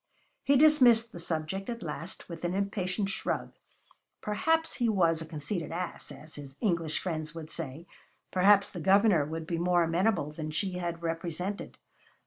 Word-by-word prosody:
He 280 0 +4
dismissed 255 -6 +6
the 175 - -8
subject 165 +4 -3
at 235 -3 -4
last 165 +3 -5
with 170 -1 -8
an 175 +1 -1
impatient 195 0 -1
shrug. 215 +2 -2 0.7
Perhaps 320 +10 0
he 240 -2 +2
was 170 -6 +2
a 160 - -6
conceited 160 +2 -4
ass, 175 +1 -4
as 155 +1 -11
his 140 -2 -10
English 170 -7 0
friends 155 -3 -4
would 160 -2 -7
say; 160 0 -5 0.5
perhaps 200 +2 +5
the 175 - -6
Governor 195 -3 +4
would 160 +1 -5
be 170 0 -2
more 175 0 +3
amenable 170 -1 +1
than 155 0 -5
she 185 +5 -2
had 170 -1 -4
represented. 170 +4 -4
175 Hz, 160 wpm, -30 LUFS, 160-200 Hz, 0.7 s, dismissed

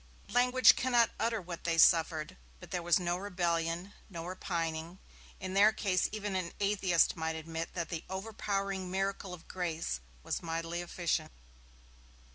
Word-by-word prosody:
Language 250 -1 +6
cannot 240 -3 +3
utter 225 +1 +1
what 175 -2 -7
they 165 -1 0
suffered, 160 -2 +4 0.2
but - - -12
there 180 - -1
was 170 0 +3
no 175 0 0
rebellion, 175 -1 -1 0.2
no 170 -3 -6
repining; 170 -2 -3 0.4
in 185 0 -5
their 205 +2 +6
case 200 -4 +1
even 210 -2 -3
an 180 -2 -2
atheist 195 -4 +3
might 160 -1 -2
admit 160 +1 -5
that 170 -3 -2
the 165 -2 -4
overpowering 195 -1 -2
miracle 195 0 -2
of 175 -2 -10
grace 165 - -2 0.2
was - - -2
mightily 165 +1 -3
efficient. 170 -3 -1
180 Hz, 145 wpm, -32 LUFS, 165-195 Hz, 0.4 s, Language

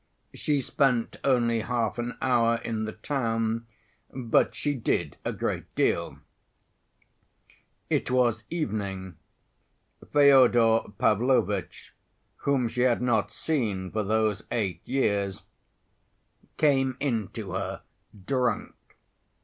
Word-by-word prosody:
She 145 -2 0
spent 125 -3 +1
only 120 -4 +2
half 115 0 -1
an 120 +1 -4
hour 115 -2 +3
in 110 -1 -2
the 110 - -5
town 115 -2 -2 0.4
but 120 -3 +1
she 145 - -1
did 125 -5 -1
a - - -1
great - - -3
deal. - - 0 1.7
It - - 0
was 120 -3 +2
evening. 100 - -3 0.9
Fyodor 125 -7 +5
Pavlovitch, 105 -5 +1 0.4
whom 135 -4 +1
she 120 +2 -2
had 125 -1 +2
not 115 -4 +1
seen 105 - -2
for 110 - -1
those 110 0 0
eight 95 -7 -1
years, 100 -7 0 1.1
came 135 -4 +2
in 115 -8 -1
to - - -6
her - - -4 0.4
drunk. 125 -1 0
115 Hz, 105 wpm, -27 LUFS, 110-130 Hz, 1.7 s, Fyodor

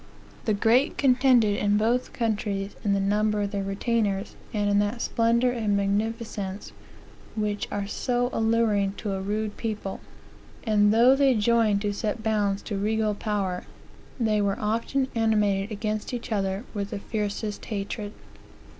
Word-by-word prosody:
The 215 - +2
great 235 +7 +3
contended 250 -6 +4
in 205 0 +2
both 235 +4 +1
countries 205 -3 -2
in 205 - +2
the 200 - +2
number 210 +1 +1
of 200 - -3
their 200 - -2
retainers, 200 0 -1 0.2
and 205 -1 0
in 205 0 +3
that 205 +3 0
splendor 235 +2 +2
and 215 -4 0
magnificence 205 -1 -2 0.6
which 210 -2 -1
are 205 -1 -2
so 245 +4 -1
alluring 220 -3 +2
to 205 0 -4
a 190 - -3
rude 210 +2 -2
people; 210 -4 -4 0.6
and 210 -2 +3
though 240 +4 +6
they 270 -2 +4
joined 215 -2 +2
to 205 -1 0
set 215 +2 -3
bounds 205 -3 0
to 205 -3 -3
regal 215 +1 +1
power, 200 -4 -2 0.5
they 215 -3 +2
were 200 -1 0
often 230 +5 0
animated 210 -3 +1
against 215 +2 -3
each 235 -1 -7
other 195 0 -1
with 200 -2 -3
the - - -4
fiercest 210 0 -3
hatred. 205 0 -4
210 Hz, 150 wpm, -26 LUFS, 200-230 Hz, 0.6 s, though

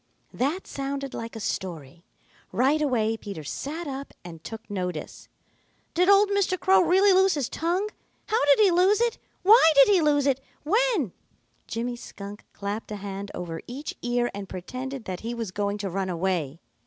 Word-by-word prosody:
That 295 +9 -1
sounded 275 0 -4
like 230 0 -6
a - - -5
story. 170 -7 -5 0.5
Right 280 +5 +2
away 225 -6 +1
Peter 200 -8 -7
sat 305 - -5
up 275 -1 -6
and 165 -2 -10
took 225 0 -8
notice. 180 -6 -5 0.7
"Did 360 +3 +3
old 400 +1 +6
Mr. 390 -2 +1
Crow 380 0 +5
really 380 +3 +5
lose 380 -1 +4
his 280 -5 -1
tongue? 355 +5 -1 0.4
How 440 -6 +1
did 290 +8 +5
he 400 -3 +6
lose 370 +4 +4
it? 475 -1 +1 0.2
Why 405 -4 +8
did 280 +7 +7
he 385 -4 +5
lose 290 -2 +3
it? 270 -1 +1 0.2
When 405 - +2 0.3
" 120 -1 -42
Jimmy 240 +2 -3
Skunk 205 -3 -9
clapped 205 +2 -5
a - - -3
hand 200 0 -6
over 165 -2 -5
each 275 +5 -6
ear 240 0 0
and 200 -1 -7
pretended 255 +7 -6
that 185 -1 -4
he 235 +2 -4
was 225 -5 -4
going 200 +1 -1
to 200 -1 -3
run 190 +1 -2
away. 170 -4 -1
245 Hz, 180 wpm, -26 LUFS, -, 0.7 s, Why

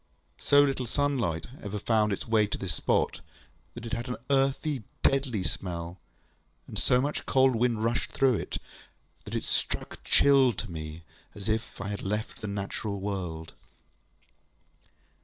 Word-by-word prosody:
So 145 0 +6
little 135 -3 0
sunlight 125 - 0 0.2
ever 105 0 -4
found 105 0 +2
its 100 - -3
way 110 -2 +4
to - - -3
this 90 -5 -3
spot, - - +1 0.5
that 120 -1 -7
it 115 - -5
had 120 +1 -2
an 125 - -1 0.2
earthy, 135 0 +2 0.2
deadly 130 -7 +2
smell; 85 -1 -4 0.7
and - - -3
so 125 - +4
much 145 +3 -2
cold 130 -2 +5
wind 115 -1 +1
rushed 115 +1 0
through 135 -2 +3
it, - - -4 0.7
that - - -5
it - - -1
struck - - -2
chill 135 -3 +5
to 105 -1 -5
me, 80 0 -6 0.3
as 100 +1 -5
if 110 +1 -1
I 95 +1 -3
had 100 - -3
left 105 +4 -3
the 105 - -3
natural 100 0 -3
world. 90 -5 -4
110 Hz, 155 wpm, -29 LUFS, 95-130 Hz, 0.7 s, So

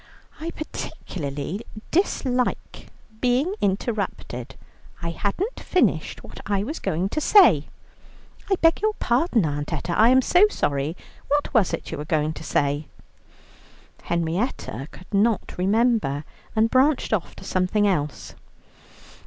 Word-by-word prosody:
"I 325 +2 -4
particularly 165 - -5 0.3
dislike 255 -8 0 0.3
being 255 - +2
interrupted. 195 - -2 0.5
I 170 - -1
hadn't 280 - -2
finished 365 - 0
what - - -11
I 200 -1 +1
was 300 +9 -4
going 175 +4 -1
to 310 - -2
say." 305 - +6 0.8
"I 390 - +4
beg 330 +2 +4
your 430 0 +2
pardon, 240 - +2
Aunt 145 0 -3
Etta, 170 - -2
I 225 +2 +6
am 260 +1 +5
so 365 +9 +5
sorry. 145 - -1 0.3
What 290 0 0
was 220 -8 +3
it - - -4
you - - -4
were 150 - -5
going 155 0 0
to - - -9
say?" 145 0 0 1.1
Henrietta 170 - -2
could 185 - -15
not 210 +2 +1
remember, 205 - +2 0.3
and 225 +1 +3
branched 265 -1 +3
off 195 -6 -1
to - - -11
something 190 +3 +1
else. 150 -7 -2
205 Hz, 130 wpm, -24 LUFS, 160-260 Hz, 1.1 s, say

